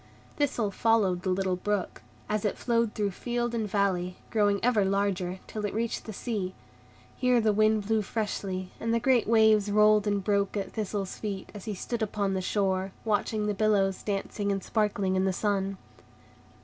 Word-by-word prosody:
Thistle 245 -8 0
followed 200 -5 +2
the 190 - -2
little 185 0 +1
brook, 205 0 -2 0.3
as 210 -1 -1
it 210 - -1
flowed 230 -2 0
through 205 -2 0
field 240 +4 -2
and 220 -3 -1
valley, 185 -3 0
growing 205 -3 +2
ever 235 -5 +3
larger, 190 -2 0
till 215 - -6
it 205 -1 -2
reached 230 +1 -2
the 220 - -6
sea. 200 -4 -3 0.6
Here 250 -1 +3
the 215 -2 +2
wind 215 0 +3
blew 220 +1 +2
freshly, 195 -3 -3
and 230 0 0
the - - +2
great 245 -1 +3
waves 220 -2 +4
rolled 210 0 +4
and 205 -1 0
broke 200 0 +1
at 200 - -3
Thistle's 205 -3 -3
feet, 200 -3 -5
as 205 -3 -9
he 215 -2 -3
stood 235 +5 -4
upon 200 -2 -1
the 190 - -1
shore, 190 -1 0
watching 215 0 0
the 210 - 0
billows 200 -2 +2
dancing 200 0 -2
and 195 -1 -2
sparkling 200 -3 0
in 185 0 +2
the 190 - +2
sun. 195 -1 -1
205 Hz, 180 wpm, -28 LUFS, 195-220 Hz, 0.6 s, waves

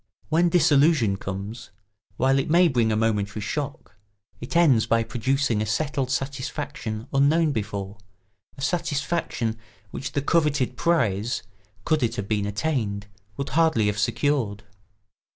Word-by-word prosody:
When 170 +2 +3
disillusion 150 - +4
comes, 100 +5 -6 0.5
while 135 +2 +3
it 135 - -2
may 175 +2 +5
bring 120 -7 +2
a - - +1
momentary 105 -2 0
shock, 140 -1 -5 0.4
it 120 - -7
ends 145 -10 +4
by 115 0 +3
producing 130 -1 0
a - - 0
settled 135 +3 -1
satisfaction 135 -3 -4
unknown 150 +3 +3
before, 100 -3 -4 0.6
a 135 - -6
satisfaction 145 -7 -1 0.3
which 135 - -5
the 145 - -1
coveted 145 -5 +1
prize, 120 - 0 0.4
could 155 -1 +2
it 120 - 0
have 100 - -4
been 105 -1 0
attained, 105 -3 -2 0.3
would 140 - -3
hardly 160 -8 +3
have 105 0 0
secured. 115 -1 0
130 Hz, 135 wpm, -25 LUFS, 110-145 Hz, 0.6 s, may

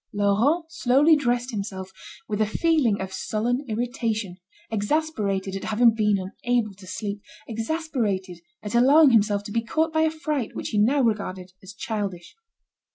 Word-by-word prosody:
Laurent 210 - +2
slowly 295 +2 +4
dressed 245 -3 0
himself, 195 -3 -5 0.4
with 215 0 -2
a - - +4
feeling 275 -4 +2
of 190 0 -5
sullen 235 +7 -1
irritation, 225 -4 -2 0.3
exasperated 205 -5 -1
at 195 - -5
having 230 +1 +4
been 210 -2 +2 0.3
unable 240 -4 +1
to 190 -1 -15
sleep, 205 +1 -5 0.3
exasperated 225 - -2 0.2
at 210 - -5
allowing 275 +5 +6
himself 205 -2 +3
to 205 - -8
be 230 - 0
caught 315 +7 0
by 315 - +2
a 320 - +3
fright 305 -6 -3
which - - -4
he 210 - 0
now 265 +7 +3
regarded 190 -5 -2
as 190 - -11
childish. 200 -6 -5
220 Hz, 155 wpm, -24 LUFS, 200-265 Hz, 0.4 s, allowing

